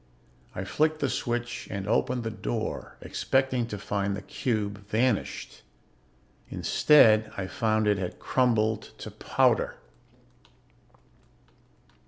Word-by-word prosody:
I 95 - -3
flicked 155 +11 +1
the 140 -3 0
switch 120 0 -3
and 100 -1 -4
opened 125 +2 +1
the 115 - -3
door, - - -4
expecting 130 -3 0
to 105 - -5
find 100 0 -2
the 100 - -7
cube 105 -3 -2
vanished. 115 0 -1 0.9
Instead 110 -7 +5
I 95 - -2
found 110 +2 0
it 105 -2 +2
had 90 -2 -4
crumbled 110 -4 +1
to - - -8
powder. - - +1
110 Hz, 110 wpm, -27 LUFS, 100-125 Hz, 0.9 s, Instead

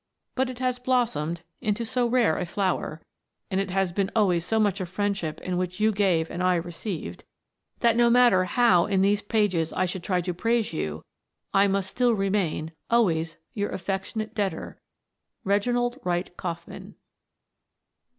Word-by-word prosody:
But 260 0 0
it 255 - -7
has 255 -1 -1
blossomed 200 - 0 0.2
into 215 +2 -1
so 245 +1 0
rare 235 -9 +2
a - - -1
flower, 175 -4 -2 0.5
and 190 0 +1
it 195 - -4
has 190 -1 0
been 195 +2 0
always 185 -6 +3
so 220 +5 0
much 205 -2 +1
a 185 - -3
friendship 190 -3 -2
in 180 -1 -2
which 185 +1 -3
you 215 +1 +4
gave 185 -6 +1
and 180 - -4
I 180 0 +3
received, 170 - -5 0.6
that, 235 -1 +4
no 240 0 +5
matter 235 -6 +5
how 185 -3 +4
in 195 -2 +2
these 205 +1 +3
pages 205 -7 +1
I 185 - 0
should 180 0 -4
try 180 +1 0
to 180 +1 -3
praise 225 +2 0
you, 80 - -4 0.5
I 195 +1 +5
must 195 -1 -1
still 245 -1 +2
remain 195 -6 -1 0.2
Always 165 -9 +2 0.2
your 205 -1 -2
affectionate 200 +3 -3
debtor, 205 -4 -3 0.6
Reginald 245 +5 +1
Wright 175 0 -2
Kauffman. 170 -2 -7
195 Hz, 160 wpm, -26 LUFS, 175-225 Hz, 0.6 s, no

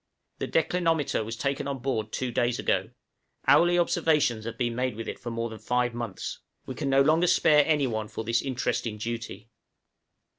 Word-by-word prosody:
The - - -2
declinometer 165 -6 +1
was 115 +2 -5
taken 140 +1 -2
on 140 -1 -2
board 120 -4 -2
two 130 -1 -2
days 120 0 +1
ago; - - 0 0.6
hourly 175 +1 +5
observations 150 -9 +2
have 115 0 -5
been 120 -2 -1
made 125 -2 -1
with 115 +1 -6
it - - -5
for 120 - -6
more 115 0 -2
than 110 - -8
five 125 +2 0
months: 115 -5 -5 0.3
we 130 - -5
can 140 +2 -3
no 135 0 +5
longer 160 +5 +3
spare 150 -4 +5
any 150 -3 +3
one 110 -3 -2
for 110 - -6
this 115 +1 +1
interesting 120 -4 -2
duty. 115 +1 -6
125 Hz, 185 wpm, -27 LUFS, 115-145 Hz, 0.6 s, hourly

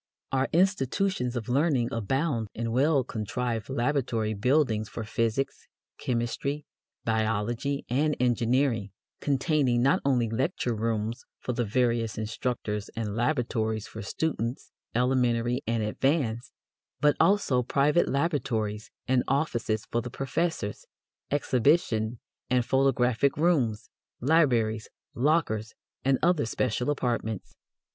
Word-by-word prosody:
Our 135 0 +1
institutions 175 -5 +1
of 115 -3 -3
learning 130 -2 +2
abound 115 +2 0
in 115 0 -2
well 135 +3 +3
contrived 115 0 -3
laboratory 120 -4 0
buildings 110 -1 +1
for 115 - -5
physics, 115 +5 -1 0.3
chemistry, 130 +5 -2 0.4
biology, 115 +5 0
and 145 +5 +1
engineering, 120 -2 +1 0.3
containing 135 -3 +2
not 135 - +3
only 125 -4 +2
lecture 125 +2 -1
rooms 115 +1 -2
for 125 - -4
the 120 0 0
various 115 0 +1
instructors 110 -1 -3
and 110 -3 -3
laboratories 115 -4 0
for - - -8
students 120 +2 -3 0.2
elementary 125 0 +2
and 115 -1 0
advanced, 120 +1 0 0.5
but 145 -1 +4
also 195 -11 +3
private 145 +6 +2
laboratories 115 -8 -1 0.2
and 130 -1 +3
offices 120 -6 0
for 120 - -1
the 125 - -6
professors, 135 - -2 0.5
exhibition 125 -5 +2 0.3
and 125 -1 +2
photographic 130 0 +2
rooms, 140 -10 +1 0.3
libraries, 120 -7 +2 0.2
lockers, 120 -6 +1 0.3
and 135 0 +3
other 170 -7 +3
special 125 +2 -1
apartments. 120 -7 -2
125 Hz, 110 wpm, -28 LUFS, 115-140 Hz, 0.5 s, but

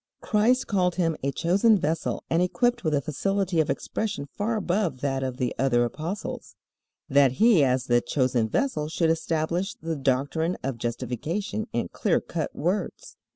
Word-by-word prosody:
Christ 235 +4 +2
called 180 -3 +1
him 165 -3 +1
a 140 - 0
chosen 200 +9 +3
vessel 160 -2 -2
and 165 - +2
equipped 240 +6 +1
with 155 -3 +1
a 140 - +1
facility 190 +4 -1
of 155 - +2
expression 200 -10 -2
far 210 - -2
above 180 -9 -1
that 135 -2 -1
of 130 -1 -3
the 125 -2 -1
other 120 -2 +3
apostles, 165 - -5 0.5
that 140 -2 +4
he 215 - +5
as 130 -1 +2
the 120 -1 +2
chosen 125 -5 0
vessel 260 - 0
should 165 0 +1
establish 165 +3 -1
the 165 0 -4
doctrine 140 +5 0
of 130 -3 -3
justification 130 - -3
in - - -2
clear - - +1
cut - - -4
words. - - -2
160 Hz, 160 wpm, -26 LUFS, 135-195 Hz, 0.5 s, he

